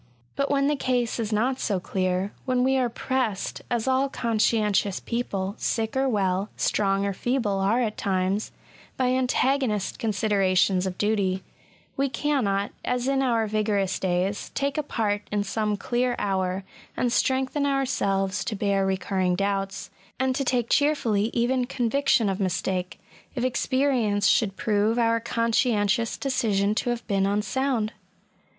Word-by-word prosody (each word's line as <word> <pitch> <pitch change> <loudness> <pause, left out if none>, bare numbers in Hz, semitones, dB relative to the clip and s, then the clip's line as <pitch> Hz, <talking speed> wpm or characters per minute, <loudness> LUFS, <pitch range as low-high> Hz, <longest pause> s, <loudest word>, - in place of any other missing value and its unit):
But 280 0 0
when 275 -1 +2
the 295 +1 +2
case 245 -4 -1
is 220 -1 -2
not 250 +5 +1
so 200 -5 0
clear, 185 +1 -1
when 255 -1 +1
we 265 +1 +3
are 255 -2 +2
pressed 235 -4 -2
(as 240 0 -1
all 265 +1 +2
conscientious 215 -5 +1
people, 200 -5 -3
sick 220 +1 -1
or 265 0 +2
well, 195 -2 0
strong 195 -1 +1
or 200 - -1
feeble, 225 -2 -1
are 200 +5 +2
at 220 -3 -2
times) 190 +1 -1 0.5
by 255 -1 +2
antagonist 255 -4 +1
considerations 195 -3 +2
of 185 - -5
duty, 195 -3 0 0.5
we 275 0 +1
cannot, 230 -8 0
as 250 0 -1
in 270 0 +2
our 235 -4 +2
vigorous 205 -3 0
days, 185 +2 -1
take 280 0 -1
a 305 - +1
part 210 -7 -1
in 205 -1 +1
some 210 +1 -1
clear 245 +3 0
hour, 190 -1 -1 0.3
and 245 -1 +1
strengthen 265 +3 +1
ourselves 195 -9 0
to 215 - -2
bear 200 -1 +1
recurring 190 -1 0
doubts, 195 0 -2 0.3
and 260 0 +1
to 275 - 0
take 245 -3 0
cheerfully 230 -8 +2
even 250 +1 +1
conviction 245 -1 +1
of 195 0 -1
mistake, 185 0 -2 0.4
if 245 - -2
experience 255 -5 +1
should 195 0 +3
prove 215 +1 +1
our 230 -1 +3
conscientious 230 -2 +1
decision 215 -7 +1
to 230 - -1
have 240 -1 -2
been 195 -2 +1
unsound. 220 +2 0
220 Hz, 145 wpm, -25 LUFS, 195-255 Hz, 0.5 s, we